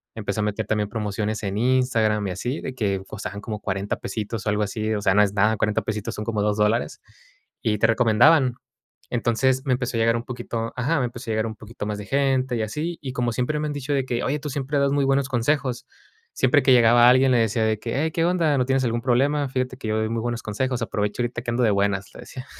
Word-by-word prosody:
Empecé 105 -2 -3
a - - 0
meter 105 +1 -2
también 105 -2 0
promociones 105 0 -3
en 100 0 -2
Instagram 115 -4 +2
y 95 - -3
así. 125 - -3
De 130 - -5
que, 100 -6 -1
costaban 100 0 -6
como 105 -1 -5
$40 100 0 -2
pesitos 110 0 -5
o 105 - 0
algo 105 +1 +1
así. 110 +2 -2
O 105 - -2
sea, 95 - +3
no 105 - +6
es 100 -1 0
nada. 105 +2 +2
$40 105 +1 +1
pesitos, 105 -1 -4
son 105 - -4
como 110 -2 -1
$2 105 0 +1
dólares, 105 +2 0 0.6
y 105 -1 0
te 115 - +4
recomendaban. 125 +4 +4 0.6
Entonces, 130 +3 +1
me 135 - 0
empezó 125 -1 -2
a - - 0
llegar 115 +1 +3
un 115 - -5
poquito 120 -2 -4
ajá. 140 +5 +1
Me 125 - +1
empezó 120 0 -9
a - - 0
llegar 110 0 0
un 110 - -6
poquito 110 0 -8
más 105 0 -3
de 100 - -7
gente 130 -1 +1
y 110 - -1
así. 155 +10 -3
Y 130 -3 -5
como 120 -1 0
siempre 130 +6 -1
me 150 - -1
han 150 - -3
dicho 145 0 -3
de 135 - +1
que: 120 -1 -2
"Oye, 145 +3 -1
tú 150 0 -5
siempre 140 +1 -2
das 140 0 +2
muy 140 -1 +2
buenos 135 -1 +1
consejos". 130 0 0 0.5
Siempre 130 +1 +3
que 130 - +5
llegaba 120 0 +6
alguien, 130 +1 +5
le 125 - +4
decía 115 0 +1
de 110 -1 0
que: 115 +2 -4
"Hey, 160 - 0
¿qué 165 0 0
onda? 170 -5 +2
¿No 125 - +2
tienes 135 0 +1
algún 120 0 -1
problema? 140 +4 +1
Fíjate 130 -1 -2
que 115 - -6
yo 110 - 0
doy 110 - -1
muy 115 0 -2
buenos 120 0 -3
consejos. 125 +3 -2
Aprovecha 105 +1 -2
ahorita, 120 0 -3
que 120 - -2
ando 120 +1 +1
de 110 - +4
buenas", 100 -1 0
le - - -11
decía. 130 -1 -9
120 Hz, 255 wpm, -23 LUFS, 105-130 Hz, 0.6 s, no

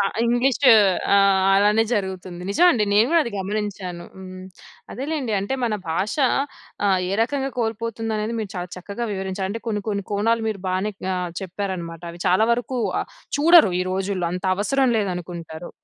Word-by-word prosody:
అ - - +4 0.2
English 245 +2 +2 0.6
ఆ! - - +6 0.4
అలానే 210 +3 +4
జరుగుతుంది. 190 -4 -3
నిజం 345 - +4
అండి, 215 -4 +1
నేను 215 +3 +5
గూడా 335 -1 +5
అది 235 - -4
గమనించాను. 190 -3 -4
హ్మ్. 185 0 -9 0.5
అదేలెండి. 275 -2 -3
అంటే 200 +7 -2
మన 220 -3 0
భాష 190 +6 -1 0.7
ఆహ్, 190 -2 +3
ఏ - - -1
రకంగా 270 +3 -2
కోల్పోతుందనేది 225 -1 -2
మీరు 210 -3 -5
చాలా 180 0 -4
చక్కగా 200 +6 -5
వివరించారు. 190 0 -3
అంటే 225 +2 -5
కొన్ని 210 -2 -2
కొన్ని 200 -2 -2
కోణాలు 225 +3 +1
మీరు 210 -3 -4
బానే 190 +3 -1 0.2
ఆహ్, 180 -1 -3
చెప్పారన్నమాట. 180 -3 -5
అవి 170 - -13
చాలా 190 +5 +4
వరకు 245 +2 -2 0.2
ఆహ్, - - -6 0.3
చూడరు 320 - +6
ఈ - - +2
రోజుల్లో. 190 -2 -1
అంత 180 +2 -5
అవసరం 265 +5 +1
లేదనుకుంటారు. 175 -4 -5
205 Hz, 160 wpm, -22 LUFS, 185-230 Hz, 0.7 s, ఆ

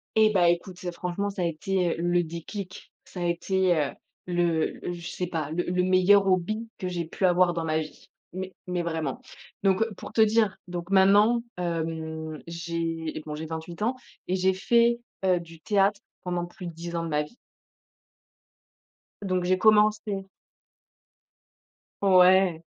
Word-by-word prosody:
Et 220 -1 +5
bah 180 -4 +4
écoute, 175 +2 -1
c'est 180 -3 -5
franchement, 180 +4 -3
ça 190 -2 -4
a - - +1
été, 170 +1 -1
heu, - - -3
le 175 0 +2
déclic, 180 +4 -8
ça 180 - -9
a - - -1
été, 180 +1 +1
heu, 145 -3 0 0.3
le 175 -2 0
je 175 0 -7
sais 180 - -3
pas, 160 -4 -3
le 175 +1 -1
le 180 0 0
meilleur 185 +2 +5
hobby 205 +5 0
que 185 -3 -3
j'ai 175 -1 -3
pu 190 - -4
avoir 180 -1 +4
dans 165 - -2
ma 155 0 0
vie, 155 -1 -8 0.2
mais 190 +1 -5
mais 180 -1 -1
vraiment, 160 -5 -3 0.4
donc 195 +2 +3
pour - - -9
te 220 - +1
dire 220 -2 +3
donc 175 0 -6
maintenant, 205 +5 +5
hem, 160 -2 -4
j'ai, 165 -2 -4
bon 150 - -5
j'ai 160 +1 -5
28 160 +2 -7
ans 240 +4 +1 0.3
et 185 - 0
j'ai 190 0 +2
fait, 235 +4 +3 0.2
heu, 180 -2 +3
du 165 -1 -13
théâtre 200 0 +2 0.2
pendant 175 -1 -2
plus 175 +1 -10
de 170 - -5
10 170 +1 -7
ans 165 - -2
de - - -4
ma 150 -1 +1
vie. 150 +11 -12 1.9
Donc, 185 -2 0
j'ai 185 +1 +2
commencé 210 -2 +3 1.7
Ouais. 185 -3 +5
180 Hz, 165 wpm, -26 LUFS, 170-195 Hz, 1.9 s, Et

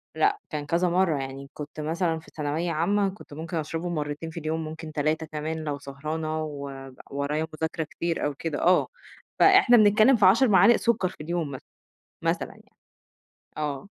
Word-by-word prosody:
لأ 410 0 +2
كان 150 -2 -4
كذا 175 +3 +1
مرَّة، 175 -4 +2
يعني 135 +1 -6
كنت 150 +1 -8
مثلًا 165 +1 -1
في - - -17
ثانوية 155 +3 -1
عامة، 195 +5 +1
كنت 190 -6 -12
ممكن 165 +2 -5
أشرَبه 165 +3 -3
مرّتين 150 0 -3
في 170 - -6
اليوم، 160 +1 -2
ممكن 160 0 -7
3 155 +2 0
كمان 155 +1 -4
لو 145 -2 -3
سهرانة 155 +3 -4
وب 140 -3 -7 0.2
ورايا 145 +3 -1
مذاكرة 160 +1 -2
كتير 165 +2 -3
أو 145 - -1
كده. 150 +1 -4
آه، 180 +1 +4 0.5
فإحنا 385 -11 +7
بنتكلم 215 +4 +6
في 205 -4 +4
10 230 +7 +6
معالق 200 +3 +6
سُكّر 225 -6 +1
في - - -13
اليوم 170 -2 -2
مثلًا، 130 - -7 0.6
مثلًا - - 0
يعني. - - -19 0.8
آه 150 +2 -3
160 Hz, 170 wpm, -26 LUFS, 150-180 Hz, 0.8 s, فإحنا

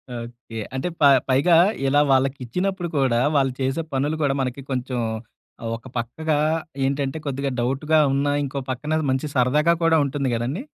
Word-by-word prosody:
Okay. 115 -1 -8 0.2
అంటే, 130 +7 -2
ప - - +3 0.3
పైగా, 145 +7 +4 0.3
ఇలా 145 +2 +4
వాళ్ళకిచ్చినప్పుడు 135 +8 0
కూడా, 130 -4 +2 0.2
వాళ్ళు 135 -2 +3
చేసే 135 +5 0
పనులు 145 +4 0
కూడా, 140 -2 +2
మనకి 130 +1 -3
కొంచెం 125 -1 -2 0.8
ఒక 115 +2 -12
పక్కగా 145 +7 -1 0.5
ఏంటంటే 140 +1 -1
కొద్దిగా 140 0 -2
డౌటుగా 140 +6 +1
ఉన్నా, 140 +1 +1
ఇంకో 140 +1 -4
పక్కనది 150 +4 -1
మంచి 130 +3 -1
సరదాగా 150 +7 +3
కూడా 165 -1 +4
ఉంటుంది 140 -1 -2
కదండీ? 130 - -3
135 Hz, 145 wpm, -23 LUFS, 130-150 Hz, 0.8 s, పైగా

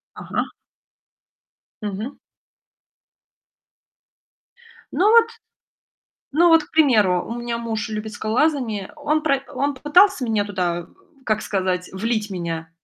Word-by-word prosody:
Ага. - - -4 1.3
Мгм. 210 +6 -5 2.8
Ну 400 +4 +3
вот 465 0 +7 1.1
ну 340 +4 +5
вот, 325 -2 +6
к - - -19
примеру, 215 - +3
у 235 +1 -5
меня 240 -1 -3
муж 230 -1 -3
любит 215 0 -5
скалолазание. 225 -2 0
Он 300 +1 0
пра 275 -3 +1
он 280 +2 0
попытался 300 +1 +4
меня 220 -3 0
туда, 175 -4 -2 0.4
как 215 -1 0
сказать, 185 -2 -1
влить 215 +2 -2
меня. 165 -3 -4
225 Hz, 110 wpm, -22 LUFS, 200-290 Hz, 2.8 s, вот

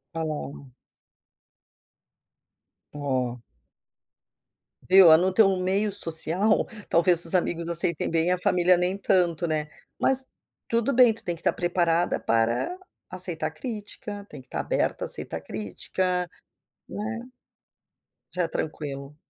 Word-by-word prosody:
Ah 165 - -3
lá, 155 -1 -3
ó. 140 -3 -10 2.2
Oh. 130 -4 -3 1.5
Viu, 185 -3 +7
ah, 160 - +8
no 185 +3 0
teu 195 -2 +3
meio 195 +3 -1
social, 175 +5 +2 0.2
talvez 170 0 +6
os 165 - +8
amigos 170 -2 -1
aceitem 170 -1 +5
bem, 165 +1 0
a 180 - +1
família 180 0 +3
nem 180 +2 0
tanto, 175 -4 0
né. 155 -1 -3 0.3
Mas 265 0 +4 0.4
tudo 235 +4 -1
bem, 245 -2 +5
tu 220 - -10
tem 175 -1 -3
que - - -11
estar - - 0
preparada 175 -1 0
para 115 - -1 0.3
aceitar 170 -4 -3
crítica, 205 +2 -8
tem - - -11
que 130 - -22
estar - - -5
aberta - - -2
a - - -7
aceitar 80 - -3
crítica, 180 - -4 0.6
né. 225 +3 -6 1.1
Já 180 - -2
é - - -1
tranquilo. 140 -2 -6
175 Hz, 130 wpm, -24 LUFS, 155-195 Hz, 2.2 s, ah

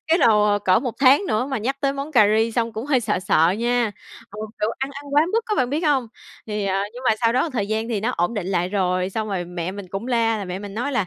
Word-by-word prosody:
Cái 330 +1 +3
đồ 210 - +4
cỡ 185 -1 +3
1 245 -1 -4
tháng 275 +6 +6
nữa 235 -4 0
mà 270 -2 -2
nhắc 260 +6 -2
tới 275 -1 +1
món 280 +3 -6
cà 215 -5 +6
ri 225 +1 +1
xong 230 -1 -1
cũng 220 +5 -5
hơi 270 -4 +2
sợ 225 - -1
sợ 175 -4 +3
nha. 240 -1 +1 0.4
Ừ, 210 - -9 0.2
kiểu 210 - +1
ăn 265 +1 -3
ăn 285 +1 -8
quá 295 - +6
mức 455 +1 +1
á 430 - 0
bạn 255 -6 0
biết 295 +3 0
hông? 265 -5 +1 0.4
Thì, 210 -2 -3
à, 195 0 0
nhưng 250 - -9
mà 220 - +3
sau 230 -1 +3
đó 260 +6 +1
thời 225 -7 -2
gian 220 +1 -1
thì 220 -4 -1
nó 230 +4 0
ổn 175 +1 -1
định 205 -5 -3
lại 180 -2 0
rồi, 185 -1 0
xong 220 +1 -3
rồi 190 -3 -2
mẹ 175 0 -4
mình 200 -2 -8
cũng 195 +5 -5
la, 230 -3 +1
là 205 - -4
mẹ 180 0 -5
mình 200 0 -8
nói 250 +6 -2
là 210 -7 0
225 Hz, 290 wpm, -22 LUFS, 200-255 Hz, 0.4 s, tháng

